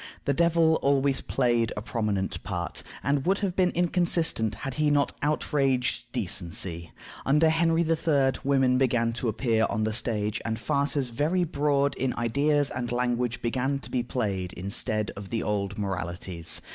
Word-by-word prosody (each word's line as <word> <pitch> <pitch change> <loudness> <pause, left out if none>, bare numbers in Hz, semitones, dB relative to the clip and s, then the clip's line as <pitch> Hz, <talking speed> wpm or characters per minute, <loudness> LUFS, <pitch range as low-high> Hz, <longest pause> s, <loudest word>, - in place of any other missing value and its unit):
The 140 - +2
devil 165 0 +3
always 140 -1 +2
played 120 -3 +1
a - - -2
prominent 105 -5 -2
part, 90 -4 -4 0.2
and 140 0 +1
would 195 +2 +3
have 180 -2 -3
been 185 -1 +3
inconsistent 170 - +1
had 135 +3 -5
he 150 +2 +2
not 145 -1 +2
outraged 135 -4 0
decency. 85 0 -2 0.3
Under 150 +4 +4
Henry 165 +1 +2
III. 155 -4 +2
women 135 -2 +3
began 115 -3 +2
to 120 +1 -3
appear 115 0 +1
on 110 -1 -1
the 110 0 0
stage, 110 -2 0
and 110 0 -2
farces 140 +3 0
very 155 +9 +1
broad 140 -3 +1
in 130 0 -2
ideas 140 +4 +1
and 120 -1 -3
language 120 -1 -1
began 130 +3 0
to 135 - -10
be 125 - +1
played 100 -7 -2
instead 100 +3 -2
of 100 -1 -8
the 115 - -2
old 100 -1 -2
Moralities. 90 -3 -3
125 Hz, 160 wpm, -27 LUFS, 110-145 Hz, 0.3 s, Under